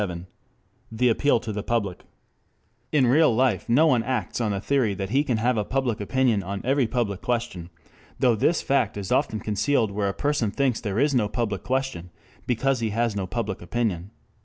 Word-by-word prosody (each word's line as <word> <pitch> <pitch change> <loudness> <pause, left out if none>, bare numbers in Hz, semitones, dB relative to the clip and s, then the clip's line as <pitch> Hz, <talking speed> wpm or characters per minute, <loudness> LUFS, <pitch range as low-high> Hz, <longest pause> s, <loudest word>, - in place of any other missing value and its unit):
CHAPTER 95 -4 -2
XXVII 85 +1 -8 0.7
THE 125 +2 +2
APPEAL 130 +2 +2
TO 110 - -5
THE 105 - -3
PUBLIC 100 -5 -1
1 - - -24 0.9
IN 145 -4 +4
real 150 -4 +4
life 120 -5 +1
no 135 +7 +5
one 130 -7 +3
acts 125 0 -2
on 110 - 0
the 100 -1 -1
theory 120 -2 +1
that 95 +1 -4
he 140 +3 +3
can 125 -6 0
have 120 +2 +1
a 105 - +1
public 125 -2 -1
opinion 120 -1 +1
on 100 +2 -5
every 135 -1 +2
public 110 -6 -2
question, 115 -8 -3 0.5
though 125 -2 +3
this 160 +10 +1
fact 125 -7 +1
is 100 -2 -5
often 110 - +1
concealed 110 +2 0
where 100 0 -1
a - - -3
person 145 -5 0
thinks 130 +2 0
there 105 -4 -3
is 140 +3 +2
no 115 -5 +2
public 105 -5 -2
question 130 -10 -2 0.4
because 130 +2 +1
he 115 -1 -1
has 115 0 0
no 95 -2 -2
public 110 -2 -3
opinion. 95 -2 -2
115 Hz, 205 wpm, -25 LUFS, 100-130 Hz, 0.9 s, no